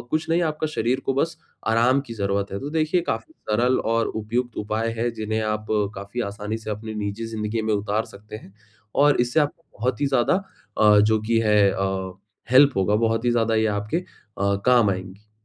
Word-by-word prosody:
कुछ 155 +1 -1
नहीं 170 +1 +3
आपका 155 -1 -1
शरीर 120 +3 +1
को 135 - +1
बस 160 +3 0 0.3
आराम 120 +4 +3
की 115 - -7
ज़रूरत 100 -1 -1
है। 100 - -3
तो 145 - -5
देखिए 160 +2 +1
काफ़ी 320 - -3 0.2
सरल 120 +4 +2 0.2
और 115 -1 +1
उपयुक्त 115 +3 -3
उपाय 110 +2 -1
है 120 +1 +1
जिन्हें 110 +1 -1
आप 105 0 -6 0.3
काफ़ी 100 +5 -5
आसानी 105 +2 -4
से 110 -1 -7
अपनी 110 +1 -5
निजी 105 +2 -3
ज़िन्दगी 110 0 -3
में 110 -1 +1
उतार 105 +2 -1
सकते 105 +2 -10
हैं। 95 -2 -15 0.4
और 145 -2 +4
इससे 125 +6 +2
आपको 150 +3 -2 0.2
बहुत 125 +1 -1
ही 145 - +2
ज़्यादा 135 +9 +2 0.4
अ, 105 -1 +6
जो 110 +1 +3
कि 115 +1 +1
है 105 -2 +4
अ, 95 -1 -2 0.4
हेल्प 140 +3 +7
होगा। 95 +2 +2
बहुत 115 +1 +1
ही 120 - +3
ज़्यादा 115 -1 +1
ये 110 0 +2
आपके 105 +10 -3
अ, 100 - -3
काम 120 -5 +5
आएँगी। 95 +3 -7
110 Hz, 200 wpm, -23 LUFS, 105-125 Hz, 0.4 s, हेल्प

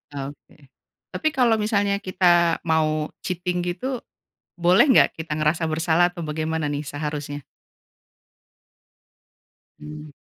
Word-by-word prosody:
Oke. 140 0 -9 0.4
Tapi 315 - -2
kalau 245 -3 +4
misalnya 205 -2 +1
kita 175 -3 +3
mau 155 -1 0
cheating 180 0 -3
gitu, 240 +9 -3 0.6
boleh 175 +7 +5
nggak 260 - +5
kita 160 -1 -4
ngerasa 155 +2 +1
bersalah 165 +2 +2
atau 170 - -7
bagaimana 155 0 -2
nih 145 +1 -3
seharusnya? 145 0 -5 2.4
Mmm. 150 0 -9
160 Hz, 105 wpm, -23 LUFS, 150-180 Hz, 2.4 s, boleh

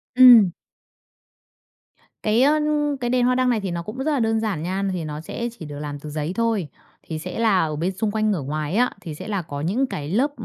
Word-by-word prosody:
Ừm. 245 -7 +9 1.7
Cái, 215 +2 +3
ơ, 295 +3 +4 0.4
cái 240 - -1
đèn 250 0 +2
hoa 250 0 +3
đăng 255 0 +2
này 235 - +2
thì 190 - -3
nó 170 0 -3
cũng 215 +7 -8
rất 280 +4 -1
là 285 - +1
đơn 225 -1 +1
giản 205 -8 -2
nha. 190 +3 -2
Thì 180 -3 -3
nó 150 0 -5
sẽ 235 +8 -4
chỉ 160 - -7
được 145 -1 -7
làm 145 -1 -5
từ 150 - -8
giấy 150 +2 -3
thôi, 225 -7 0 0.4
thì 160 -1 -5
sẽ 180 +6 -6
là 220 -5 +3
ở 155 -1 -3
bên 170 +5 -1
xung 205 +3 -2
quanh 215 0 +1
ngửa 180 - -1
ngoài 150 +4 -3
á, 250 +3 +3
thì 160 -5 -7
sẽ - - -8
là 200 -3 -1
có 145 -3 -6
những 230 - 0
cái 145 - -5
lớp 255 - +1
195 Hz, 240 wpm, -23 LUFS, 155-235 Hz, 1.7 s, Ừm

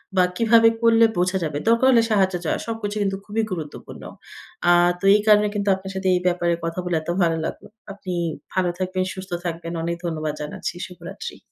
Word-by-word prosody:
বা, 185 - +5
কিভাবে 230 0 +5
করলে 230 0 +5
বোঝা 185 +2 +1
যাবে? 150 -2 -2
দরকার 230 +3 +4
হলে 230 -2 +5
সাহায্য 190 -3 +3
দেওয়া, - - 0
সবকিছু 220 -2 -4
কিন্তু 195 -1 -1
খুবই 215 +2 -1
গুরুত্বপূর্ণ। 160 -5 -7 0.7
আ - - +7 0.3
তো - - -21
এই 210 - +3
কারণে 210 0 +6
কিন্তু 200 -1 0
আপনার 190 0 -8
সাথে 190 0 -2
এই 180 - +1
ব্যাপারে 175 -1 +1
কথা 165 +2 -3
বলে 175 -2 -1
এত 155 - -9
ভালো 165 -1 +2
লাগলো। - - -6 0.3
আপনি 190 -2 -6 0.4
ভালো 185 -2 +1
থাকবেন, 185 0 -1
সুস্থ 190 -1 -9
থাকবেন। 170 0 -4
অনেক 170 0 -1
ধন্যবাদ 155 -3 -2
জানাচ্ছি। 150 +3 -5
শুভরাত্রি। 180 - -9
185 Hz, 190 wpm, -22 LUFS, 170-210 Hz, 0.7 s, আ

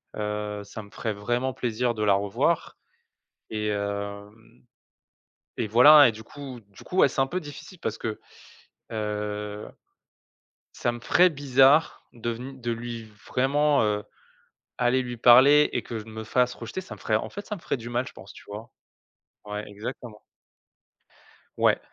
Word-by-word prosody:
heu 105 -1 -3
ça 105 +2 -9
me 100 - -17
ferait 110 -2 -3
vraiment 120 +6 -1
plaisir 120 0 -1
de 105 - -2
la 105 -1 +4
revoir 100 0 0 0.7
et 105 -1 -2
hem, 100 +2 -5 0.9
et 110 - -1
voilà, 145 +6 +8
et - - -1
du 110 +1 -11
coup, 135 -2 -9
du 100 - -15
coup, 185 - -6
ouais, - - +7
c'est 135 - -1
un 135 - +2
peu 180 +6 -2
difficile 160 +3 -11
parce 110 - -3
que, 110 -1 -4 0.7
heu 105 -1 -4 1.1
ça 120 - 0
me 120 - -7
ferait 180 +9 +4
bizarre 140 +1 +3
de 120 0 -4
veni 130 +4 -7
de 120 -1 -2
lui, 115 0 -5 0.2
vraiment, 140 +1 +2
heu, 105 -1 0 0.7
aller 125 +1 +2
lui 120 -1 -6
parler 135 +6 +7
et - - -1
que 115 -2 -5
je 105 - -10
me 110 0 -7
fasse 125 +3 +1
rejeter. 120 +11 -6
Ça 185 - -9
me - - -18
ferait, - - 0
en - - -1
fait, 205 +1 -8
ça 210 - -4
me 175 - -12
ferait - - -2
du 120 0 -8
mal, 120 +2 -1
je - - -10
pense, 95 - -13
tu - - -14
vois? 105 +3 -8 0.7
Ouais, 105 0 -5
exactement. 105 +1 -8 1.4
Ouais. - - +3
115 Hz, 170 wpm, -26 LUFS, 105-130 Hz, 1.4 s, voilà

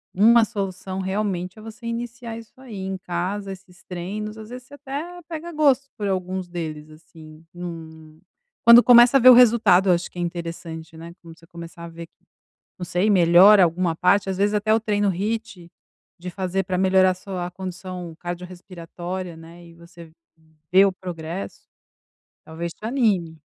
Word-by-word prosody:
uma 225 +4 +5
solução 190 -3 -5
realmente 190 0 -3
é - - -12
você 225 +2 -11
iniciar 235 0 -6
isso 225 -1 -13
aí 245 -6 -10
em 190 0 -4
casa, 185 +3 -4
esses 185 -2 -13
treinos, 210 +5 -6
às 220 0 -10
vezes 250 0 -9
você 285 - -13
até 295 +6 -7
pega 335 +1 -7
gosto 280 -3 +2
por 205 -3 -3
alguns 185 -1 -3
deles, 155 -3 -6
assim 155 0 -16
num 160 -3 -10 0.5
quando 235 +1 +10
começa 245 +2 +7
a - - +3
ver 255 0 +8
o - - +11
resultado 230 -6 +5
eu - - +6
acho 175 0 -2
que - - -16
é - - -3
interessante, 165 -1 -6
né, 165 +1 -10
quando 165 -1 -14
você 165 - -20
começar 170 0 -11
a 170 - -7
ver, 165 0 -10 0.7
não 180 - -5
sei, 180 +3 0
melhora 185 +2 +7
alguma 170 0 -1
parte, 195 +3 +2
às 190 - -3
vezes 205 +2 +1
até 210 +1 +1
o - - +3
treino 205 -2 0
HIIT 205 -1 -4 0.5
de 180 +1 -6
fazer 190 +1 -2
pra 180 0 -2
melhorar 185 0 +3
sua 180 -1 -6
condição 180 -2 -8
cardiorrespiratória, 175 0 -7
né, 165 +2 -14
e 170 - -16
você 170 -1 -15 0.6
vê 190 +2 +7
o 195 - +2
progresso, 175 -1 -7 0.8
talvez 165 +1 -6
te - - -12
anime. 205 -10 0
185 Hz, 170 wpm, -22 LUFS, 170-215 Hz, 0.8 s, o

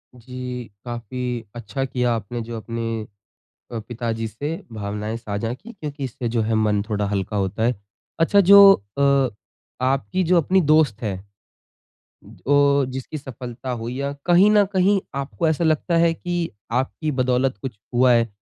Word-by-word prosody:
जी 125 0 -7 0.2
काफ़ी 120 0 -4
अच्छा 120 +3 -3
किया 125 -2 0
आपने 115 +2 -5
जो 115 +1 -6
अपने 115 -1 -4 0.7
अ, 115 - -3
पिताजी 115 0 -4
से 145 +9 -4 0.2
भावनाएँ 105 +1 -4
साझा 115 0 -3
की 230 - -11
क्योंकि 150 -7 -6
इससे 125 -1 -4
जो 115 - +3
है 110 +1 0
मन 105 -1 +2
थोड़ा 105 -1 0
हल्का 100 +1 -2
होता 95 +3 -1
है। 120 +2 +2 0.4
अच्छा 165 +5 +4
जो 200 +1 +9 0.3
अ, 140 -2 +3 0.6
आपकी 135 - 0
जो 175 +1 +3
अपनी 190 +4 +3
दोस्त 150 -8 +3
है 105 -3 -1
अ, 95 - -13 1.7
जिसकी 130 +4 -6
सफलता 130 -1 -7
हुई 120 0 -4
या 140 0 -2
कहीं 180 +4 +6
न 210 -1 +5
कहीं 195 +1 +3
आपको 140 +4 -1
ऐसा 160 +2 +1
लगता 160 +2 +1
है 165 0 +4
की 175 0 -2 0.3
आपकी 155 +4 -3
बदौलत 130 -1 +1
कुछ 125 -6 -6 0.2
हुआ 125 +1 +5
है? 115 -1 +3
125 Hz, 155 wpm, -22 LUFS, 115-155 Hz, 1.7 s, जो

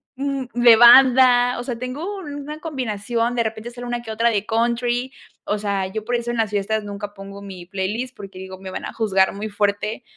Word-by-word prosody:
d 275 -1 -3
de 240 -1 +7
banda, 245 0 +7
o - - -4
sea, 245 -3 -4
tengo 280 - -5
una 295 -2 -7
combinación, 240 -5 -2
de 235 - +1
repente 220 +1 -5
sale 245 0 -8
una 240 0 -3
que 225 -2 -8
otra 230 +2 +2
de 210 -2 -1
country, 240 +3 0 0.3
o 210 - -1
sea, 200 -2 -1
yo 215 +3 -5
por 245 - -1
eso 240 0 -2
en 240 - -3
las 220 -2 +1
fiestas 210 +1 -1
nunca 205 0 -6
pongo 200 0 -10
mi 190 -3 -9
playlist, 205 +7 -4
porque 195 -2 -10
digo, 190 0 -8
me 190 0 -9
van - - -5
a - - -6
juzgar 195 -4 +2
muy 210 +2 -5
fuerte 205 +3 -1
230 Hz, 215 wpm, -21 LUFS, 205-245 Hz, 0.3 s, de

